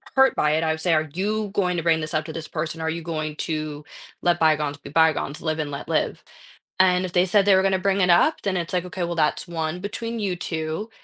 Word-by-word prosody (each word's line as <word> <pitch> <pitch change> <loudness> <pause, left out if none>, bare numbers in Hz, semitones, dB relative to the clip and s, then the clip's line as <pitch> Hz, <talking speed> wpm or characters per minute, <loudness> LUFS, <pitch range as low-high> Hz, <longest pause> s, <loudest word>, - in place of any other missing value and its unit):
hurt 265 0 +5
by 150 - +2
it. 160 +1 +1
I 160 - +1
would 160 - -3
say, 175 0 +2
"Are 155 -1 +1
you 210 +4 -1
going 180 -3 +1
to 165 - -2
bring 165 -1 +3
this 155 0 -5
up 155 0 +1
to 160 - -7
this 160 0 -6
person? 160 0 -4
Are 160 - -1
you 165 +1 -3
going 155 -2 -3
to 155 -2 -3 0.4
let 175 -1 +2
bygones 150 -2 +2
be 145 - -11
bygones? 160 -2 +2
Live 155 -1 -2
and 150 -2 -2
let 140 - -7
live." - - -1 0.6
And 180 0 +4
if 180 - -9
they 180 0 +4
said 200 +1 +3
they 200 - +6
were 190 - +4
going 195 - +2
to 190 - +2
bring 195 +1 +1
it 180 - +3
up, 175 - +4
then 195 -2 -1
it's 170 -2 -3
like, 180 -1 0
"Okay, 180 0 -4
well, 170 0 -2
that's 155 +3 0
one 165 0 -3
between 230 +4 -4
you 195 -4 -1
2." 160 +5 -4
170 Hz, 265 wpm, -24 LUFS, 155-185 Hz, 0.6 s, they